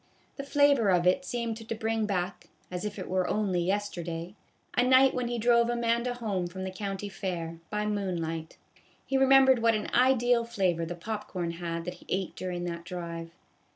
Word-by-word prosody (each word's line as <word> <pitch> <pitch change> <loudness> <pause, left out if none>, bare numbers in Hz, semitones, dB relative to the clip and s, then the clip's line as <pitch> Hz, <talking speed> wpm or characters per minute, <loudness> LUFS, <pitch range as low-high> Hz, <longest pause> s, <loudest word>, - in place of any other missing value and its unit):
The 275 - -4
flavor 280 -6 +4
of 180 -2 +3
it 185 +10 +3
seemed 235 -3 -2
to 225 0 -5
bring 220 0 -1
back, 185 -1 -2 0.2
as 180 +2 -4
if 210 0 -4
it 185 - -5
were 185 0 0
only 195 -4 0
yesterday, 175 -2 -2 0.4
a - - +4
night 260 +1 +6
when 250 -1 -1
he 240 0 -2
drove 235 +1 +4
Amanda 235 +1 0
home 200 -7 -2
from 190 +2 -7
the 190 - -3
county 195 +1 -4
fair, 170 -4 -4
by 210 0 -1
moonlight. 170 -6 -3 0.5
He 270 - -2
remembered 265 -1 +6
what 230 -1 +4
an 215 - -3
ideal 245 -1 +4
flavor 185 -7 0
the 175 - -4
pop 210 +5 -5
corn 175 -3 -3
had 170 -1 -4
that 180 - -4
he - - -18
ate 190 -1 -2
during 180 -1 -4
that 170 -1 -4
drive. 170 -2 -6
200 Hz, 190 wpm, -29 LUFS, 175-235 Hz, 0.5 s, night